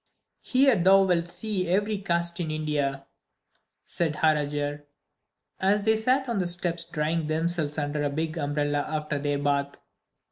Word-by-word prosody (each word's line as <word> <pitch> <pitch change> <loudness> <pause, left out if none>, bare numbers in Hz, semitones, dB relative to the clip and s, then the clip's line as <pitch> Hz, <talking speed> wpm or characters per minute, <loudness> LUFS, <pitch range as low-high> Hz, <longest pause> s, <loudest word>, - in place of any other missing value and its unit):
"Here 265 -1 +4
thou 195 +1 +5
wilt 175 -3 +1
see 185 +1 -3
every 205 +3 +1
caste 170 -2 -1
in 165 -3 -2
India," 145 -3 -2 0.8
said 160 -3 -1
Harajar, 145 -1 0 0.7
as 200 +2 +2
they 220 +1 +4
sat 255 +5 +1
on 235 -4 -1
the 180 - 0
steps 175 -1 -1
drying 160 0 -1
themselves 160 -1 0
under 145 0 -2
a 145 - 0
big 155 +3 -3
umbrella 145 -1 -1
after 150 0 -3
their 145 0 -1
bath. 140 0 -1
160 Hz, 145 wpm, -26 LUFS, 145-185 Hz, 0.8 s, thou